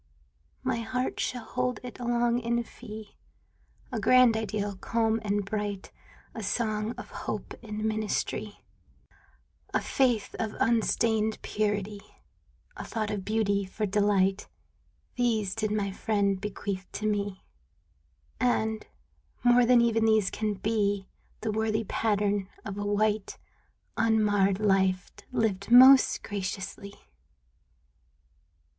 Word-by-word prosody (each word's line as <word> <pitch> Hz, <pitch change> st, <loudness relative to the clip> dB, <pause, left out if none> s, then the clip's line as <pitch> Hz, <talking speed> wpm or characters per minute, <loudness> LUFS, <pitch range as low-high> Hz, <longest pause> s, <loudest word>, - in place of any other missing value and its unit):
My 255 Hz, -2 st, 0 dB
heart 250 Hz, +3 st, -2 dB
shall 245 Hz, -2 st, -2 dB
hold 250 Hz, 0 st, -2 dB
it 250 Hz, 0 st, -8 dB
long 240 Hz, 0 st, +1 dB
in 235 Hz, 0 st, 0 dB
fee 215 Hz, -3 st, -11 dB, 0.3 s
— -, -, -34 dB
A 235 Hz, -, -2 dB
grand 250 Hz, +2 st, +5 dB
ideal, 210 Hz, -2 st, -2 dB
calm 225 Hz, +2 st, 0 dB
and 205 Hz, -1 st, 0 dB
bright, 205 Hz, -1 st, -4 dB, 0.4 s
A 225 Hz, -, -6 dB
song 215 Hz, +1 st, -1 dB
of -, -, -9 dB
hope -, -, -5 dB
for 225 Hz, -, -12 dB
ministry, 215 Hz, -1 st, -2 dB, 1.1 s
A -, -, +4 dB
faith 245 Hz, -6 st, 0 dB
of 220 Hz, -2 st, -2 dB
unstained 220 Hz, -1 st, +1 dB
purity, 205 Hz, -1 st, -2 dB, 0.7 s
A -, -, -6 dB
thought 215 Hz, -2 st, -3 dB
of 205 Hz, -2 st, -3 dB
beauty 205 Hz, -1 st, +1 dB
for 205 Hz, +3 st, -3 dB
delight 200 Hz, -1 st, +2 dB, 0.3 s
— -, -, -41 dB
These 220 Hz, -6 st, +1 dB
did 215 Hz, 0 st, -1 dB
my 205 Hz, -2 st, -1 dB
friend 200 Hz, -1 st, 0 dB
bequeath 200 Hz, -2 st, -5 dB
to 215 Hz, -, -4 dB
me; 205 Hz, -2 st, -1 dB, 1.0 s
And, 220 Hz, -3 st, 0 dB, 0.6 s
more 245 Hz, 0 st, +5 dB
than 245 Hz, -1 st, +6 dB
even 225 Hz, -1 st, +2 dB
these 220 Hz, -3 st, +3 dB
can 215 Hz, -1 st, -2 dB
be, 200 Hz, -1 st, 0 dB, 0.3 s
The 220 Hz, -, -1 dB
worthy 220 Hz, +1 st, 0 dB
pattern 205 Hz, -2 st, 0 dB, 0.2 s
of 200 Hz, 0 st, -5 dB
a -, -, -2 dB
white, 210 Hz, 0 st, 0 dB, 0.6 s
Unmarred 205 Hz, -3 st, +3 dB
life 190 Hz, -3 st, +2 dB, 0.2 s
lived 210 Hz, -5 st, -1 dB
most 260 Hz, +2 st, +8 dB
graciously. 200 Hz, 0 st, -5 dB
215 Hz, 120 wpm, -28 LUFS, 200-225 Hz, 1.1 s, most